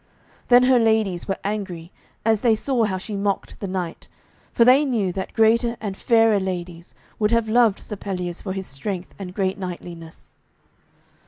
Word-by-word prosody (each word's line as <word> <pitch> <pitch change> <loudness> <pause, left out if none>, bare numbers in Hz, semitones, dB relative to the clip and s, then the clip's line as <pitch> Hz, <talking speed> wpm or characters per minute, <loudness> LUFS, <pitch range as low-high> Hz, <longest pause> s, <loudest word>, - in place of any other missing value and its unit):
Then 245 0 +6
her 255 -1 +5
ladies 220 -6 +1
were 195 - -1
angry, 190 -5 -4 0.3
as 220 -2 +3
they 230 -3 +4
saw 240 0 0
how 190 -3 -2
she 205 +3 -6
mocked 200 0 -2
the 200 - -4
knight, 185 -3 -5 0.4
for 235 - +4
they 260 +4 +6
knew 220 -10 0
that 190 - -5
greater 235 +1 +3
and 205 -3 -4
fairer 225 -1 +3
ladies 175 -2 -5 0.2
would 210 -1 +2
have 230 -1 +1
loved 225 -2 +4
Sir 210 - -7
Pelleas 180 -3 -4
for 190 - -4
his 190 -1 -5
strength 180 +6 -5
and 185 -1 -7
great 195 0 -1
knightliness. 170 -3 -8
200 Hz, 170 wpm, -22 LUFS, 185-225 Hz, 0.4 s, Then